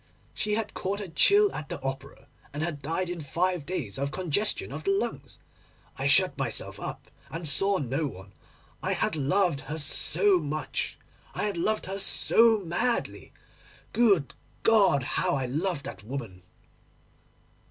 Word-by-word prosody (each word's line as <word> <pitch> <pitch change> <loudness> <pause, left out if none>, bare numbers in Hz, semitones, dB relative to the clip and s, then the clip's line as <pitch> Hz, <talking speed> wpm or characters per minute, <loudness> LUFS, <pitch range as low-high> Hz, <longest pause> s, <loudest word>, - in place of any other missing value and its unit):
She 210 0 0
had 220 -1 -3
caught 195 +2 -3
a 205 - -5
chill 405 - +5
at 150 - -6
the - - -4
Opera, 135 +1 -6 0.2
and 145 +2 -3
had 155 -4 -3
died 165 +6 -2
in 175 -1 -5
five 175 +1 -1
days 145 - -4
of 140 +1 -1
congestion 185 +6 -1
of - - -6
the 395 - -1
lungs. 395 +1 -2 0.6
I - - -1
shut - - +4
myself - - -4
up - - -7 0.2
and 165 0 -4
saw 195 +6 +2
no 140 +2 -1
one. 95 -5 -11 0.5
I - - 0
had - - 0
loved 155 +1 +1
her 155 - -3
so 180 +5 +3
much, 155 0 -3 0.4
I - - -2
had 205 -2 -1
loved 215 +6 0
her 195 +1 -4
so 225 +2 +5
madly. 195 +8 -1 0.6
Good 200 - +3 0.3
God! 200 - +4
how 140 - 0
I 135 - -1
had 125 +1 -4
loved 170 -3 -1
that 95 - -8
woman! 110 -6 -6
165 Hz, 160 wpm, -27 LUFS, 140-200 Hz, 0.6 s, chill